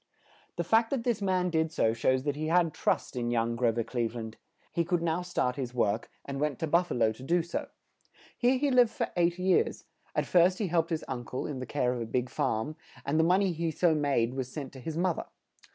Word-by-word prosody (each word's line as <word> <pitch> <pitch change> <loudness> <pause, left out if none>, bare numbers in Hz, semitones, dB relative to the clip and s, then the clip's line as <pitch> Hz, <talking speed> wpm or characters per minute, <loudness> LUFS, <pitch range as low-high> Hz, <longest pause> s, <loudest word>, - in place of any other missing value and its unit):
The 170 - -1
fact 225 +6 +3
that 265 -4 -1
this 235 -3 0
man 185 -2 +1
did 160 -1 +1
so 110 -7 +2
shows 130 +3 +1
that 145 -1 -1
he 155 +1 -3
had 165 -1 +3
trust - - -1
in 120 -1 -1
young 115 0 0
Gro 120 -1 +2
ver 115 +1 -1
Cleve 115 0 -2
land; 110 -1 -6 0.4
he 170 - +1
could 175 0 0
now 165 +1 0
start 130 -8 -1
his 125 -2 -4
work, 110 -2 0 0.2
and 140 -1 -4
went 150 -4 0
to - - -2
Buf 170 +3 +2
fa - - -3
lo 115 -2 +3
to 110 - -11
do 170 +5 +1
so. 170 - -4 0.7
Here 250 +2 +3
he 280 +1 +1
lived 245 -2 +6
for - - -3
eight 175 0 +2
years; 185 0 +1 0.3
at - - +1
first 180 +1 +4
he 205 -5 -1
helped 165 -1 +1
his 160 -2 -2
un 125 -2 -4
cle, 130 +2 -4
in 140 -4 -4
the 130 - -5
care 125 -3 0
of 120 - -4
a 115 - -3
big 125 +2 -1
farm, 140 +9 -1 0.3
and 145 +3 +1
the - - +5
mon 180 +4 +4
ey 190 - +1
he 165 0 -2
so 165 +1 +2
made 140 -6 +1
was 130 -1 -4
sent 140 -3 -6
to 135 - -10
his 160 +4 -5
moth 175 -1 +1
er. - - -7
155 Hz, 250 wpm, -29 LUFS, 125-175 Hz, 0.7 s, lived